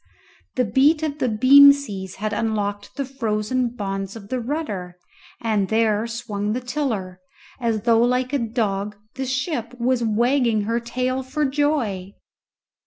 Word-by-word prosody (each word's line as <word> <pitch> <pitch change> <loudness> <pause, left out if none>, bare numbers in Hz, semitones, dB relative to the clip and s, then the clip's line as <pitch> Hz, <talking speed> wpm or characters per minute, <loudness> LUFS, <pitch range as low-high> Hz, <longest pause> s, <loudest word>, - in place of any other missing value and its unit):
The 250 - +2
beat 285 +9 +3
of 300 -1 -2
the 255 - +1
beam 270 +6 +8
seas 200 -10 -6
had 215 +2 -3
unlocked 205 0 -2
the 275 -1 -2
frozen 245 -1 -1
bonds 195 -3 -4
of 205 -3 -10
the 255 - -1
rudder, 225 - -4 0.4
and 215 -4 0
there 220 0 +2
swung 215 -3 -3
the 245 - -1
tiller, 240 -9 -3 0.4
as 230 -3 0
though 230 0 +3
like 250 +2 +1
a 285 - +2
dog 210 -3 -2 0.2
the 265 0 -4
ship 255 -2 -3
was 245 0 +1
wagging 235 0 +2
her 230 +3 0
tail 255 +2 -2
for 280 +4 -2
joy! 265 -10 -1
235 Hz, 150 wpm, -22 LUFS, 210-260 Hz, 0.4 s, beam